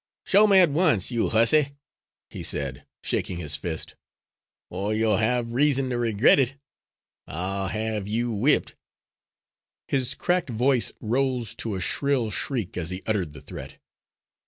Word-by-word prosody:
"Show 210 +2 +5
me 200 -2 +5
at 180 -5 +6
once, 150 - +2
you 115 -2 0
hussy," 135 +6 +4 0.6
he - - -7
said, 70 -1 -3 0.2
shaking 90 - -2
his 75 -4 -2
fist, 80 +2 -5 0.8
"or 100 +4 -2
you'll 110 -2 +2
have 115 +1 0
reason 135 -1 +2
to 120 - -1
regret 115 +3 +4
it. 135 0 +1 0.7
I'll 95 +4 -3
have 110 -2 -3
you 115 +3 -1
whipped." 115 +8 +1 1.1
His 130 -1 -1
cracked 180 -4 0
voice 125 +2 +1
rose 125 -1 -1
to 110 -3 -3
a - - -3
shrill 130 +2 0
shriek 115 -9 -3
as 85 -2 -3
he 90 +1 -5
uttered 95 -9 -1
the 75 - -11
threat. - - -9
115 Hz, 145 wpm, -25 LUFS, 95-135 Hz, 1.1 s, at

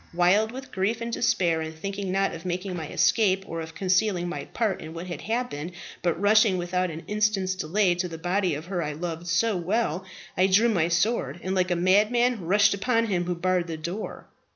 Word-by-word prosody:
Wild 195 +5 +3
with 265 +2 -9
grief 195 +4 0
and 235 0 -4
despair, 180 -10 +1
and 160 0 -5
thinking, 195 +3 -4
not 195 +1 +1
of 165 - -8
making 180 +1 -3
my 160 -3 -5
escape, 195 +2 +2
or 165 0 -4
of 160 0 -8
concealing 185 -1 +1
my 175 - -5
part 220 -5 -1
in 160 +1 -8
what 170 +2 -6
had 175 -1 -6
happened, 220 -8 -3 0.3
but 170 -2 0
rushing 210 -1 +4
without 180 +1 -1
an 165 0 -7
instant's 210 -3 +1
delay 185 +2 +1
to 175 +1 -2
the 165 -2 -7
body 180 0 0
of 155 +3 -7
her 180 -1 -2
I 150 -2 -3
loved 170 +2 -5
so 195 +6 +2
well, 180 0 -1 0.3
I 185 +1 +4
drew 210 +5 +4
my 170 -7 +2
sword, 170 - 0
and 185 - -2
like 185 -1 +1
a 175 - +1
madman 210 +5 +3
rushed 205 +3 +4
upon 230 +3 +1
him 180 -5 -1
who 180 0 -1
barred 180 0 0
the 165 -1 -4
door. 170 +7 -6
185 Hz, 210 wpm, -26 LUFS, 170-210 Hz, 0.3 s, rushing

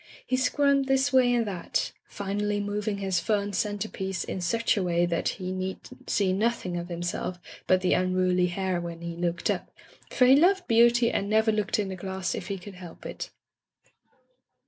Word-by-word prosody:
He 255 - 0
squirmed 275 +1 +2
this 270 0 +2
way 255 -2 +5
and 240 -2 +2
that, 190 -4 -2 0.2
finally 205 +1 -2
moving 205 0 -2
his 190 -3 0
fern 205 0 -1
centrepiece 200 -2 -2
in 185 - -4
such 230 +7 +1
a 205 - 0
way 175 -1 +2
that 170 -1 0
he 185 0 -4
need 185 0 -3 0.3
see 190 -2 +2
nothing 205 -3 0
of 175 0 -4
himself 175 +1 -3 0.3
but 185 0 +4
the 180 - +2
unruly 185 0 +2
hair 185 0 -1
when 170 -1 -6
he 170 0 -5
looked 170 0 -1
up, - - -4 0.4
for 250 - +3
he 260 +2 +7
loved 360 +5 +3
beauty 235 +1 +5
and 200 - -1
never 220 +1 +3
looked 210 -1 0
in 205 -2 -1
the 190 - -4
glass 190 0 -3
if - - -5
he 200 - -3
could 190 +2 -10
help 180 -2 -11
it. - - -6
195 Hz, 185 wpm, -27 LUFS, 180-225 Hz, 0.4 s, he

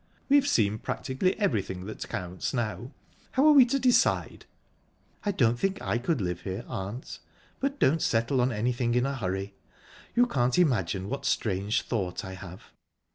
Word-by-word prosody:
"We've 285 0 +5
seen 110 - +2
practically 160 - -1
everything 95 - -1
that 110 - -7
counts 90 +6 -4
now. 120 +1 -3 0.4
How 265 +3 +3
are 310 - +8
we 270 -4 +8
to 275 - +1
decide?" 255 -2 +2 0.8
"I 205 - +1
don't 120 - +2
think 195 +4 0
I 120 - -1
could 130 0 -1
live 90 -2 -2
here, 95 -1 -5
aunt, 100 +7 -6 0.4
but 275 +1 -1
don't 160 - +3
settle 115 +3 +1
anything 120 +2 0
in 125 +1 +2
a 140 - -1
hurry. 95 -3 -3 0.6
You 245 +1 +5
can't 125 - +1
imagine 100 - +1
what 140 +4 -4
strange 100 -4 0
thought 95 -7 -3
I 95 - -7
have. 95 -1 -11
120 Hz, 160 wpm, -28 LUFS, 95-160 Hz, 0.8 s, are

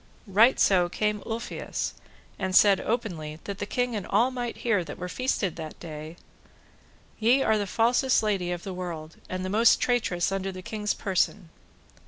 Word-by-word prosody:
Right 220 +5 +4
so 180 -3 +4
came 210 +2 -1
Ulfius, 230 +1 -4 0.5
and 190 -1 -1
said 200 -1 +6
openly, 165 -10 -3
that 200 -1 -6
the 205 - -3
king 245 0 -1
and 200 -4 -4
all 230 +6 +3
might 245 -2 -4
hear 210 -6 +2
that 150 - -8
were 180 - -5
feasted 200 -5 -1
that 160 -2 -7
day, 155 -1 -8 1.0
Ye 245 +5 +4
are 220 -1 +2
the 205 - -2
falsest 240 +4 +2
lady 195 -4 0
of 175 -1 -4
the 190 - -5
world, 170 -3 -6
and 185 0 -3
the - - -3
most 225 +3 +5
traitress 205 -8 +1
unto 195 0 -2
the 185 0 -9
king's 210 0 -2
person. 190 -1 -1
200 Hz, 175 wpm, -27 LUFS, 180-225 Hz, 1.0 s, said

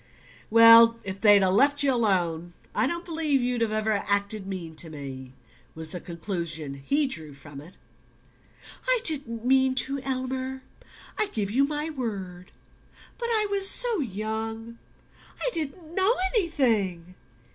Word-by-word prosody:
"Well, 230 +1 +8
if 195 0 -7
they'd 205 -3 +6
left 280 +10 +3
you 275 -2 +2
alone 175 -7 0 0.2
I 215 +4 +1
don't 340 +4 -4
believe 315 -4 0
you'd 245 -1 -1
ever 215 -1 0
have 200 - -3
acted 200 0 -1
mean 180 -4 -6
to 165 - -2
me," 135 -4 -9 0.4
was 160 0 -4
the 180 - -5
conclusion 170 -4 -5
he 290 - +1
drew 160 - -6
from 140 0 -11
it. 170 +5 -15 1.1
"I - - +3
didn't 250 - -1
mean 260 0 +3
to, 275 +2 -1
Elmer... 260 0 -4 0.6
I 430 - +2
give 205 - -3
you 270 +5 +3
my 300 +2 -3
word 195 - -6 0.7
but 475 - -2
I 440 -2 +2
was 395 -1 +2
so 480 -5 +2
young... 225 0 -5 0.6
I - - -1
didn't 315 +1 -6
know 385 +6 +4 0.2
anything...." 225 - 0
230 Hz, 145 wpm, -26 LUFS, 185-280 Hz, 1.1 s, Well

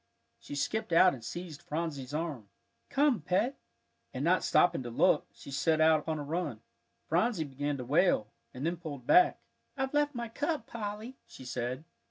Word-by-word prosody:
She 145 - -8
skipped 155 +9 -1
out 180 +2 +6
and 120 - -9
seized 165 +5 -7
Phronsie's 150 -5 -4
arm. 150 -9 -4 0.4
"Come, 280 - +3
Pet," 195 - 0 0.5
and - - -3
not - - +3
stopping 175 - +3
to 120 - -5
look, 115 - +3
she 140 - -12
set 155 +3 +2
out 160 0 +5
upon 155 +1 -3
a 150 - -4
run. 150 -6 -3 0.4
Phronsie 180 +2 +1
began 145 0 -3
to 125 - -6
wail, 140 - +2 0.2
and 130 +4 -5
then 170 +1 0
pulled 145 -7 -7
back. 360 - +5 0.3
"I've 265 0 -2
left 295 -1 +2
my 235 0 -3
cup, 290 +2 -2
Polly," 220 +3 -6
she 130 - -12
said. 125 +3 -3
160 Hz, 175 wpm, -31 LUFS, 140-215 Hz, 0.5 s, out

